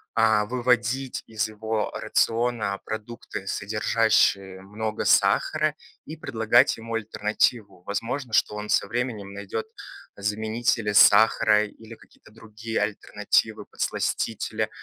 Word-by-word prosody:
а, 110 -2 +3
выводить 125 +2 0
из 110 0 -2
его 110 0 -3
рациона 115 -4 0
продукты, 110 -3 -7
содержащие 100 -2 +1
много 110 +2 -4
сахара, 155 -1 +2 0.3
и 155 - -8
предлагать 120 -5 +2
ему 115 0 -8
альтернативу. 105 -2 -1
Возможно, 115 +5 -4
что 105 0 +2
он 105 0 -6
со - - +2
временем 115 -5 -4
найдет 100 - -5 0.5
заменители 110 +1 -1
сахара 105 +1 +5
или 110 +2 -13
какие-то 105 - -21
другие 110 0 -6
альтернативы, - - -1
подсластители, 110 -1 -2
110 Hz, 105 wpm, -25 LUFS, 105-115 Hz, 0.5 s, сахара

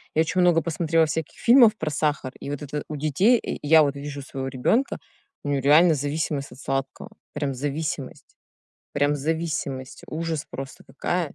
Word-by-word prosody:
я 160 - +4
очень 180 +3 +1
много 175 -2 +4
посмотрела 165 -1 +1
всяких 160 0 -4
фильмов 235 -3 +6
про 155 - -2
сахар 145 -3 -1
и 140 - -7
вот 145 -1 -4
это 145 +1 -4
у 155 - -5
детей, 155 - +3
и - - -4
и 145 - -8
я 160 0 +7
вот 140 -1 0
вижу 140 0 -6
своего 135 0 -5
ребенка: 135 - 0 0.5
у 145 - -3
него 140 -1 +1
реально 155 +4 +6
зависимость 145 0 -2
от 125 - -13
сладкого, 135 -1 -4 0.2
прям 145 -2 -2
зависимость 145 +3 -4 0.6
прям 145 +1 +1
зависимость, 145 -3 -3
ужас 160 -1 -3
просто 135 -1 -8
какая. 175 -4 -2
150 Hz, 175 wpm, -24 LUFS, 140-165 Hz, 0.6 s, я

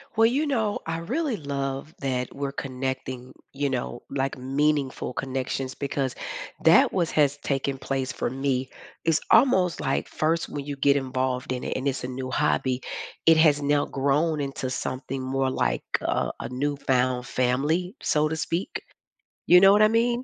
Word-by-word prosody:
Well, 225 0 +5
you 275 +6 +1
know, 225 -8 0
I 165 0 -2
really 265 - -1
love 140 -1 -4
that 125 -2 -2
we're 140 0 -3
connecting, 130 -1 -4 0.2
you 140 +1 -1
know, 125 -2 -3
like, 135 0 -2
meaningful 135 0 0
connections, 130 0 -3
because 140 -2 -2 0.5
that - - +6
was 175 -3 0
has 145 -2 +3
taken 140 -1 -2
place 135 -1 -2
for - - -2
me. 130 0 -1 0.3
It's 165 -1 +3
almost 190 -8 +4
like 135 - -1
first 160 +2 0
when 140 -1 -5
you 145 0 -4
get 140 0 +4
involved 130 -1 -1
in 125 0 -3
it - - -3
and 130 +2 -2
it's 140 0 -1
a - - -2
new 130 0 -5
hobby, 130 -3 +1 0.4
it 165 -1 +7
has 150 -2 +5
now 145 0 +2
grown 145 +4 +1
into 135 -2 -3
something 130 +1 -4
more 135 +1 0
like 65 - 0 0.2
a - - 0
a - - -5
newfound 130 -2 0
family, 145 - 0
so 150 0 +2
to 160 - -2
speak. 175 +2 -3 0.7
You 180 +1 +8
know 195 0 +8
what 205 +1 +5
I 215 - +7
mean? 235 +2 +1
140 Hz, 170 wpm, -26 LUFS, 130-160 Hz, 0.7 s, You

